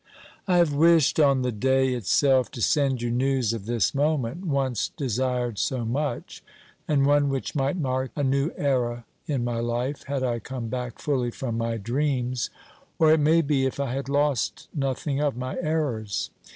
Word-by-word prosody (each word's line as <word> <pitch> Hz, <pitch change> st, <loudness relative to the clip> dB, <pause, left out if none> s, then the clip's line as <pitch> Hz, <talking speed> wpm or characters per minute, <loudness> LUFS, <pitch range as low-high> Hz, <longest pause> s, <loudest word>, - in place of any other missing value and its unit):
I 180 Hz, -2 st, +3 dB
have 170 Hz, -4 st, +3 dB
wished 160 Hz, 0 st, +4 dB
on 140 Hz, -3 st, +4 dB
the 125 Hz, -, 0 dB
day 130 Hz, +3 st, +2 dB
itself 130 Hz, +3 st, +2 dB
to 120 Hz, -, -6 dB
send 135 Hz, -5 st, +2 dB
you 120 Hz, -, -1 dB
news 130 Hz, -2 st, +1 dB
of 110 Hz, -3 st, -6 dB
this 120 Hz, -3 st, +1 dB
moment, 145 Hz, +1 st, 0 dB
once 135 Hz, -, 0 dB
desired 125 Hz, -3 st, -2 dB
so 125 Hz, -3 st, -1 dB
much, 140 Hz, +6 st, -3 dB, 0.4 s
and 140 Hz, -2 st, +3 dB
one 145 Hz, 0 st, +3 dB
which 135 Hz, -1 st, -3 dB
might 140 Hz, +4 st, 0 dB
mark 130 Hz, -4 st, -1 dB
a 145 Hz, -, -1 dB
new 135 Hz, +3 st, +1 dB
era 120 Hz, -4 st, 0 dB, 0.2 s
in 140 Hz, -6 st, -1 dB
my 120 Hz, -1 st, -2 dB
hfe, 120 Hz, +4 st, -2 dB
had 140 Hz, -1 st, -2 dB
I 120 Hz, -2 st, 0 dB
come 120 Hz, 0 st, -6 dB
back 125 Hz, 0 st, -4 dB
fully 130 Hz, -5 st, -1 dB
from 120 Hz, -1 st, -4 dB
my 115 Hz, 0 st, -1 dB
dreams, 125 Hz, +1 st, -1 dB, 0.5 s
or 160 Hz, -1 st, +5 dB
it 160 Hz, -, +3 dB
may 160 Hz, +3 st, +4 dB
be, 140 Hz, -2 st, +1 dB
if 130 Hz, -, -5 dB
I 135 Hz, -3 st, -1 dB
had 135 Hz, +1 st, -4 dB
lost 145 Hz, -3 st, 0 dB
nothing 135 Hz, +1 st, -1 dB
of 145 Hz, -5 st, 0 dB
my 130 Hz, +1 st, -4 dB
errors. 140 Hz, -, -2 dB
130 Hz, 180 wpm, -25 LUFS, 120-145 Hz, 0.5 s, or